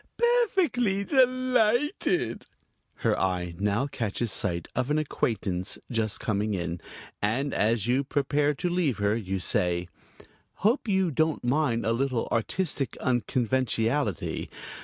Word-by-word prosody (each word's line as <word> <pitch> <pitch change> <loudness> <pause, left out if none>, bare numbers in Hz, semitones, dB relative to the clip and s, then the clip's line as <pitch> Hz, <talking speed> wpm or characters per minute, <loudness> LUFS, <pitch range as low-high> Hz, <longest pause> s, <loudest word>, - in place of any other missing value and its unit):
"Perfectly 375 - +2
delighted!" 255 - +2 0.5
Her - - +1
eye 90 -2 -1
now 105 +5 +1
catches 115 -4 -2
sight 85 -3 -1
of 130 +2 0
an 150 - +2
acquaintance 100 -10 -1
just 110 -3 0
coming 105 -1 -1
in, 85 -1 -3 0.4
and 125 +7 0
as 110 -1 +2
you 125 +4 +2
prepare 145 +1 +1
to 180 - -2
leave 170 - +1
her 100 +1 +1
you 95 -4 -2
say: 90 -1 0 0.8
"Hope 235 +3 +3
you 190 -4 +2
don't 155 0 +1
mind 125 -2 +1
a 115 - +2
little 125 -1 0
artistic 140 - -1
unconventionality. 120 - 0
125 Hz, 120 wpm, -27 LUFS, 105-175 Hz, 0.8 s, Hope